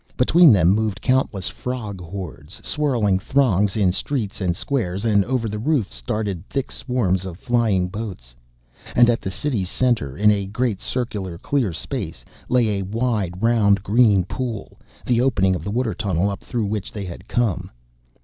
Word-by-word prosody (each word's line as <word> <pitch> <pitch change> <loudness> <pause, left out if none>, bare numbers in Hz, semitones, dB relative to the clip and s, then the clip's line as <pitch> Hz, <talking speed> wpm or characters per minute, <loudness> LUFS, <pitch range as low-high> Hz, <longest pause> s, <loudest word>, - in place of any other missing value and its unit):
Between 160 +5 +6
them 90 -5 +5
moved 105 0 +1
countless 130 -8 0
frog 110 -7 -5
hordes, 85 -3 -7
swirling 120 -11 +1
throngs 105 -4 +2
in 95 -4 +3
streets 105 0 -3
and 90 -2 0
squares, 100 -5 -2
and 100 -3 +4
over 125 -2 -1
the 105 0 -4
roofs 110 - -1
darted 100 - -2
thick 135 -1 -2
swarms 95 -8 0
of 90 -3 -7
flying 110 -5 +1
boats. 90 - -7 0.6
And 120 0 +6
at 115 - -1
the 95 - -3
city's 100 -3 -2
center, 105 - 0
in 105 0 +5
a 100 -2 0
great, 110 -1 -1
circular, 105 -8 -3
clear 130 - 0
space, 80 - -5 0.2
lay 115 -5 +2
a - - -2
wide, 105 -3 -2
round, 105 -4 +3
green 105 -3 +4
pool 120 +1 -5 0.3
the 120 -1 +2
opening 95 -8 +2
of 80 - -5
the 100 - -4
water 115 0 0
tunnel 95 +1 0
up 100 - -7
through 120 -4 -2
which 105 -1 -3
they 100 -2 -5
had 90 +2 -9
come. 115 -8 0
105 Hz, 170 wpm, -22 LUFS, 95-120 Hz, 0.6 s, Between